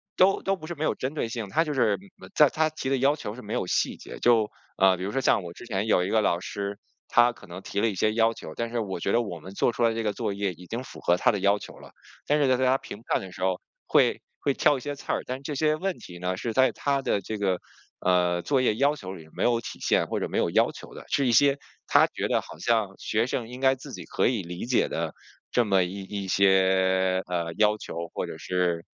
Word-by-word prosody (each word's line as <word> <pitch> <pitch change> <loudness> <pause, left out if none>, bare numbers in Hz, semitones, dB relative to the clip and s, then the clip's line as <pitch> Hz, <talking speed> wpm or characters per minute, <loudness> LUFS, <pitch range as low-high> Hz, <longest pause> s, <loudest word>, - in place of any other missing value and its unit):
都 190 +1 +4
都 195 - 0
不 170 - -11
是 175 - -5
没 155 -1 -5
有 - - +1
针 130 +3 -3
对 145 -7 -2
性， 115 -2 -4
他 160 +10 +2
就 155 - -4
是 120 -6 +3 0.3
嗯， 95 - -12
在 150 -2 +6
他 160 +3 +1
提 150 -4 -4
的 135 - +2
要 135 +3 +3
求 105 -8 -6
是 125 - -9
没 105 - -5
有 - - -1
细 - - +1
节， - - -10
就 115 -3 +4 0.3
呃， 95 -1 +5
比 90 - -6
如 100 - -2
说 135 - 0
像 105 - +3
我 85 -1 -8
之 120 - -12
前 100 -3 -1
有 90 -4 +3
一 90 - -2
个 110 - +3
老 85 -4 +1
师， 100 +2 -5 0.3
他 120 0 +5
可 - - -16
能 90 +2 -8
提 100 - -3
了 - - +3
一 100 - -4
些 110 +4 +1
要 115 0 +3
求， 80 - -9
但 115 0 -2
是 120 0 -2
我 95 -5 -3
觉 95 - -1
得 120 - +3
我 90 -7 -5
们 95 +5 -11
做 110 - +2
出 120 - -6
来 115 -1 +3
这 115 0 -2
个 105 -1 0
作 100 - -2
业 100 -2 -2
已 90 +2 -14
经 115 +6 -4
符 - - -11
合 85 - +2
他 - - +3
的 105 - -2
要 100 +2 +3
求 - - -11
了。 - - -14 0.4
但 150 - +3
是 145 - +3
在 130 -1 +3
在 130 - +1
他 130 +1 +4
评 105 - -10
判 - - +2
的 95 - -9
时 90 - -11
候 95 -1 +1 0.3
会 - - +3 0.2
会 140 - +1
挑 145 - +3
一 - - -8
些 145 +1 -4
刺 140 - -5
儿， - - -1
但 130 +1 -5
这 145 +1 -4
些 155 +2 +2
问 190 +3 -2
题 90 -1 -11
呢 90 +1 -1
是 115 +3 -3
在 130 +2 +4
他 140 -1 0
的 100 - 0
这 110 +3 -5
个， 95 -3 0 0.4
呃， 90 -1 +2
作 135 -3 +2
业 120 -4 +2
要 140 +5 +2
求 95 -8 -7
里 80 -4 -11
没 - - -2
有 120 -1 +3
体 110 - -8
现 - - +2
或 - - -2
者 - - -2
没 - - -2
有 - - +2
要 - - +3
求 - - -12
的。 - - -10
是 140 - +2
一 120 - +3
些 140 +4 +5 0.3
他 - - +6
觉 - - -3
得 - - +1
好 - - -12
像 110 -4 +1
学 110 +2 0
生 120 -2 -2
应 125 +1 -8
该 135 0 +4
自 135 +2 -11
己 - - -7
可 - - +1
以 120 -4 0
理 90 +3 -6
解 125 0 +2
的 - - -3 0.4
这 120 - +3
么 95 -3 +3
一 95 +3 -5
一 100 0 -5
些， 95 -1 +3
呃， 85 -2 -2
要 105 0 +4
求 85 -4 -6
或 - - -2
者 - - -7
是 90 -2 -1
110 Hz, 300 characters per minute, -26 LUFS, 95-130 Hz, 0.4 s, 在